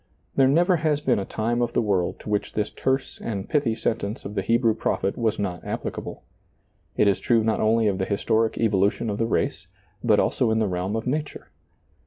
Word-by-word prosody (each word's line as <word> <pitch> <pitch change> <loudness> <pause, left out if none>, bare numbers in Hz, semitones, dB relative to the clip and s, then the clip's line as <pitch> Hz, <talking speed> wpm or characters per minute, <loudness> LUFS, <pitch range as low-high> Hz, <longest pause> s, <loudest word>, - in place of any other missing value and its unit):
There 135 -1 +5
never 175 +6 +4
has 155 -2 +1
been 130 -7 +1
a 95 - -3
time 115 +4 -1
of 120 - -1
the - - +2
world 95 -4 0
to - - -8
which 105 - -1
this 105 -1 -1
terse 130 0 -2
and 100 -3 -4
pithy 140 -7 +1
sentence 110 0 -2
of 100 - -5
the 100 - -1
Hebrew 115 +3 +2
prophet 100 -2 -1
was 110 -2 0
not 90 -4 -3
applicable. - - -5 0.7
It - - +4
is 100 - +2
true 115 -2 +2
not 110 0 +1
only 110 0 +3
of 100 -2 0
the 95 - 0
historic 110 +3 0
evolution 105 +1 +1
of 100 - -4
the 115 - +1
race, - - -1 0.4
but - - +4
also - - +1
in 110 - +2
the 110 -1 +1
realm 90 +3 -2
of 115 - -3
nature. 150 +3 -3
110 Hz, 210 wpm, -24 LUFS, 100-120 Hz, 0.7 s, There